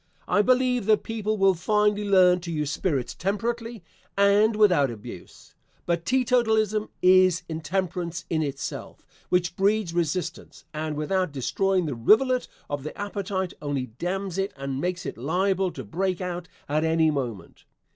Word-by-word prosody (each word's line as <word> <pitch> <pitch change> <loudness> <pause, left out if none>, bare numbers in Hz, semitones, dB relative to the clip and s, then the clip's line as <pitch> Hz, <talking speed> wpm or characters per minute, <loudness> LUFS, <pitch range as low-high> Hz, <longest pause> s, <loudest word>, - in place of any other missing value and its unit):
I 205 - +3
believe 250 -1 +2
that 215 -1 +3
people 215 -1 -2
will 195 -1 +4
finally 210 +3 +1
learn 185 -2 +5
to 170 -1 -6
use 150 -2 -2
spirits 140 -10 -1
temperately 230 +3 -3 0.3
and 205 +2 +4
without 180 -10 +4
abuse, 110 -4 -11 0.3
but 170 -1 -1
teetotalism 220 -4 +2
is 185 -1 +5
intemperance 170 +2 -3
in 160 -1 0
itself, 140 -2 -5 0.2
which 175 -1 +1
breeds 200 -2 +1
resistance, 175 +2 -3
and 155 0 -3
without 185 +3 0
destroying 185 +7 0
the 150 - -2
rivulet 245 - +3 0.2
of 145 -1 -3
the 155 - -7
appetite 200 -2 -3
only 145 -3 -2
dams 190 +1 -3
it 195 +1 -1
and 135 0 -4
makes 180 +1 -2
it - - -6
liable 185 +7 +1
to 135 -6 -8
break 185 - -2
out 180 -1 -4 0.2
at 150 +2 0
any 160 -1 +3
moment. 120 - -5
185 Hz, 145 wpm, -25 LUFS, 155-205 Hz, 0.3 s, learn